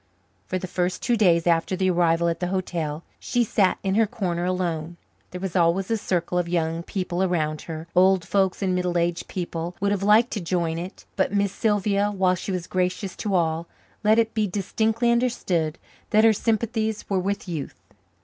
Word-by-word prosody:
For 185 - -1
the 185 - -4
first 180 0 -2
two 240 - +2
days 175 -6 +3
after 170 +2 +2
the 185 0 +1
arrival 170 -1 +2
at 170 - -1
the 180 - -1
hotel 170 -4 -3 0.2
she 245 -1 +1
sat 200 -4 +2
in 190 - 0
her 220 +1 +3
corner 180 -6 -2
alone. 175 -2 -2 0.3
There 180 - -7
was 190 -1 -4
always 180 +3 +2
a - - +3
circle 180 -3 -1
of 175 -1 -2
young 165 -1 0
people 180 0 -3
around 155 -5 0
her; 160 0 -6
old 185 -1 +4
folks 195 -1 +1
and 185 -1 +1
middle 180 -1 0
aged 170 0 -1
people 175 -1 -4
would 200 +1 +1
have 200 -2 0
liked 215 +4 +4
to 210 - -3
join 170 -2 -1
it, 180 +3 -8
but 195 0 0
Miss 200 -1 +2
Sylvia, 205 -1 +1
while 190 -3 +2
she 185 +2 -4
was 180 -2 -2
gracious 185 +1 -2
to 205 -3 -1
all, 165 -1 0 0.4
let 215 +1 +4
it 225 -1 +2
be 215 -2 +1
distinctly 220 +5 0
understood 185 -10 0 0.3
that 215 0 +4
her 225 -1 +6
sympathies 220 0 -1
were 195 -2 +1
with 200 +2 -2
youth. 160 -5 -5
185 Hz, 195 wpm, -24 LUFS, 170-205 Hz, 0.4 s, her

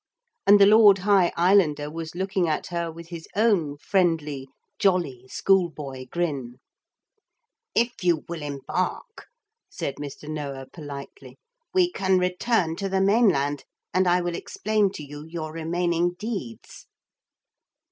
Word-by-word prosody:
And 205 +1 +8
the 200 - +8
Lord 210 -1 +7
High 195 -2 +3
Islander 170 -5 +3
was 165 0 -6
looking 190 -1 0
at 155 - -1
her 170 -1 -2
with 165 +1 -11
his 165 -2 -8
own 195 -10 +2
friendly 155 -6 0 0.3
jolly 170 - +1
schoolboy 150 -7 0
grin. 140 -8 -3 1.2
'If 235 -3 0
you 170 -4 +2
will 170 -2 -5
embark,' 150 - -4 0.4
said 140 - -5
Mr. 145 +1 -8
Noah 140 -3 -5
politely, 145 - -9 0.4
'we 360 -1 +4
can 190 - +1
return 180 -1 +1
to 195 0 -3
the 190 0 +1
mainland, 190 - +2 0.3
and 185 +1 +3
I 180 +1 +3
will 175 0 -2
explain 210 +3 0
to 150 - -7
you 145 +1 -9
your 160 -2 -6
remaining 170 +1 0
deeds.' 195 - -7
170 Hz, 130 wpm, -25 LUFS, 150-195 Hz, 1.2 s, And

